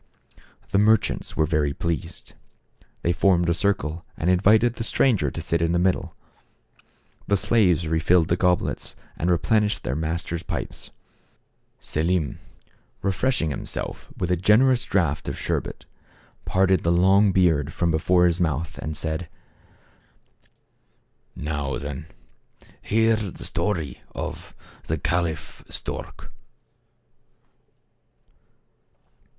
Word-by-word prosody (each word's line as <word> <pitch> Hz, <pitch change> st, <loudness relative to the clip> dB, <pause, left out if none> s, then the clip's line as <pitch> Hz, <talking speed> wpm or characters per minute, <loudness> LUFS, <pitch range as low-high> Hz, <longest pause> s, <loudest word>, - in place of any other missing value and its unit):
The 100 Hz, -, +3 dB
merchants 110 Hz, +1 st, +2 dB
were 80 Hz, -, +3 dB
well 75 Hz, -2 st, 0 dB
pleased. 85 Hz, -4 st, -4 dB, 0.7 s
They 85 Hz, -, +2 dB
formed 90 Hz, -1 st, +3 dB
a -, -, +3 dB
circle 85 Hz, -3 st, -1 dB
and 85 Hz, +3 st, +1 dB
invited 110 Hz, +6 st, +4 dB
the 115 Hz, -, -5 dB
stranger 110 Hz, -, +2 dB
to 85 Hz, -, -6 dB
sit 85 Hz, 0 st, 0 dB
in 85 Hz, 0 st, +1 dB
the -, -, +2 dB
middle. 90 Hz, -1 st, 0 dB, 1.1 s
The 100 Hz, -, +3 dB
slaves 90 Hz, -7 st, +2 dB
refilled 80 Hz, +1 st, +3 dB
the 85 Hz, -, +2 dB
goblets 90 Hz, -1 st, 0 dB, 0.2 s
and 85 Hz, -, -1 dB
replenished 105 Hz, +4 st, +1 dB
their 65 Hz, -, -2 dB
masters' 80 Hz, +2 st, -3 dB
pipes. -, -, -6 dB, 0.9 s
Selim, 80 Hz, 0 st, -1 dB, 0.6 s
refreshing 100 Hz, -, 0 dB
himself -, -, -5 dB
with 90 Hz, -1 st, -1 dB
a -, -, +4 dB
generous 120 Hz, +8 st, +4 dB
draught 85 Hz, -7 st, 0 dB
of -, -, -5 dB
sherbet, -, -, -3 dB, 0.6 s
parted 95 Hz, -2 st, +2 dB
the 85 Hz, -, +1 dB
long 95 Hz, +3 st, +5 dB
beard 80 Hz, -6 st, +2 dB
from 85 Hz, 0 st, 0 dB
before 90 Hz, +3 st, +3 dB
his 85 Hz, +1 st, +2 dB
mouth, 80 Hz, -1 st, -1 dB
and 75 Hz, -1 st, -4 dB
said: 80 Hz, +1 st, -3 dB, 2.1 s
"Now, 75 Hz, -3 st, -3 dB
then, 70 Hz, +1 st, -6 dB, 0.7 s
hear 115 Hz, +1 st, +3 dB
the 105 Hz, -5 st, -6 dB
story 80 Hz, -11 st, -2 dB
of -, -, -6 dB, 0.3 s
the 80 Hz, -, -1 dB
Caliph 80 Hz, -1 st, -2 dB
Stork." -, -, -7 dB
85 Hz, 115 wpm, -24 LUFS, 80-95 Hz, 2.1 s, long